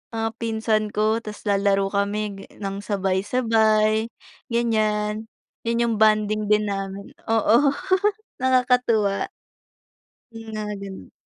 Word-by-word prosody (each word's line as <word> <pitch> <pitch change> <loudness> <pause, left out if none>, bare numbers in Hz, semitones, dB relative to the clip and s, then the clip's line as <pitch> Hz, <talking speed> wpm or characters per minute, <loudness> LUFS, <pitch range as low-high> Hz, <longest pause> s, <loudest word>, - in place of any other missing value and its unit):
Mga 225 0 0
pinsan 220 -1 0
ko 215 +1 +2
ta's 210 -2 -9
lalaro 195 -1 +2
kami 200 +1 0 0.2
ga - - -10 0.2
ng 195 0 -3
sabay-sabay, 215 +2 +2 0.4
ganyan. 215 -2 0 0.4
Yan 235 0 +1
yung 230 -2 0
bonding 215 0 +3
din 210 0 +4
namin, 195 +3 -5 0.2
oo 225 0 +4 0.8
nakakatuwa. 250 -5 +2 1.1
Yung 225 0 -9
mga 210 -1 -3
ganun. 195 -1 -9
215 Hz, 105 wpm, -23 LUFS, 200-225 Hz, 1.1 s, din